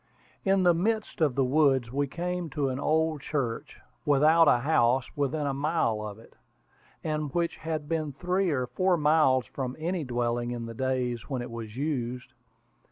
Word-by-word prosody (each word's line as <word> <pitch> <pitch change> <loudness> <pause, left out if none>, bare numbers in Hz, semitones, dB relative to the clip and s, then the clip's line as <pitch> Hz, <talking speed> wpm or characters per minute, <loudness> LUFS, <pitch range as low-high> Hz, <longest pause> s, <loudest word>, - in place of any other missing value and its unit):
In 195 -1 +3
the 175 -1 +6
midst 215 +2 -1
of 145 -6 +3
the 135 - +3
woods 135 -3 +3
we 140 +1 0
came 175 +3 -3
to 140 -1 -1
an 130 0 -3
old 155 0 +1
church, 130 -6 -3 0.2
without 155 +3 +5
a - - +6
house 130 -2 +3
within 145 +1 -1
a 140 - 0
mile 140 -6 0
of 105 -1 -6
it, 115 - -17 0.7
and 155 -2 -2
which 170 -1 0
had 155 -2 -4
been 155 -2 -1
three 180 +6 0
or 130 -5 0
four 185 +7 +1
miles 150 -5 +3
from 130 -2 -5
any 170 +2 -2
dwelling 120 -1 -1
in 120 -1 -4
the 115 - -7
days 125 0 -2
when 130 -3 -2
it 120 - -8
was 115 -1 -7
used. 130 -4 -3
140 Hz, 175 wpm, -28 LUFS, 125-160 Hz, 0.7 s, the